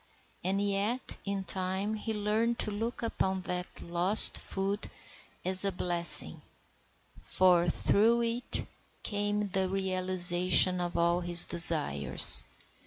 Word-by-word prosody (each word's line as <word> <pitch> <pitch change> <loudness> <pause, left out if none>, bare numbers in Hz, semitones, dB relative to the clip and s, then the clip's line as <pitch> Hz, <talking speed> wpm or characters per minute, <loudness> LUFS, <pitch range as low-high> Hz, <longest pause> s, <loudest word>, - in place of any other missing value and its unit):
And 190 +2 -3
yet 205 +5 -4
in 200 -1 -5
time 190 +3 -5
he 220 +1 -7
learned 220 +3 -3
to 215 - -2
look 225 +4 -6
upon 190 -4 -4
that 180 -1 -7
lost 175 +5 +3
foot 200 +2 -6 0.6
as 185 +1 +4
a 200 - -1
blessing, 175 -2 +2 0.8
for 175 -2 0
through 230 +7 0
it 235 +1 -4 0.4
came 205 0 -4
the 190 -1 -3
realization 185 -1 +2
of 175 0 -6
all 170 +1 -1
his 175 0 +8
desires. 155 - +3
190 Hz, 115 wpm, -27 LUFS, 180-205 Hz, 0.8 s, his